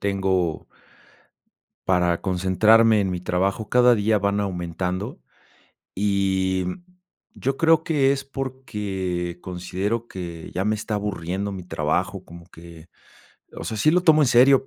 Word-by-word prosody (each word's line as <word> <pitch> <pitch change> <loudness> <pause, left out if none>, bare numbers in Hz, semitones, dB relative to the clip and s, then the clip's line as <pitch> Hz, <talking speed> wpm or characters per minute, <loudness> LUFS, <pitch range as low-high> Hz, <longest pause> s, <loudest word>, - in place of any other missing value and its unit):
tengo 95 -4 -1 1.2
para 90 -2 +2
concentrarme 105 +4 +4
en 95 -2 0
mi 90 - -3
trabajo 95 +4 -1
cada 125 -1 +5
día 105 0 +2
van 100 +1 0
aumentando. 90 0 -4 0.7
Y, 95 -2 0
mm, 135 - -6 0.5
yo 135 +1 -2
creo 160 0 +3
que 140 -4 +2
es 140 0 -1
porque 105 -10 -4
considero 95 +6 -3
que 85 -3 -7
ya 95 +2 -2
me 105 +1 +1
está 110 0 -4
aburriendo 100 -1 -3
mi 95 -1 -6
trabajo 90 +3 -2
como 85 -1 -13
que, 85 0 -14 0.7
o - - -6
sea, 110 - -4
sí 155 - +4
lo 180 +2 +2
tomo 160 -3 +5
en 140 - +3
serio, 130 +3 +5
100 Hz, 140 wpm, -23 LUFS, 90-115 Hz, 1.2 s, cada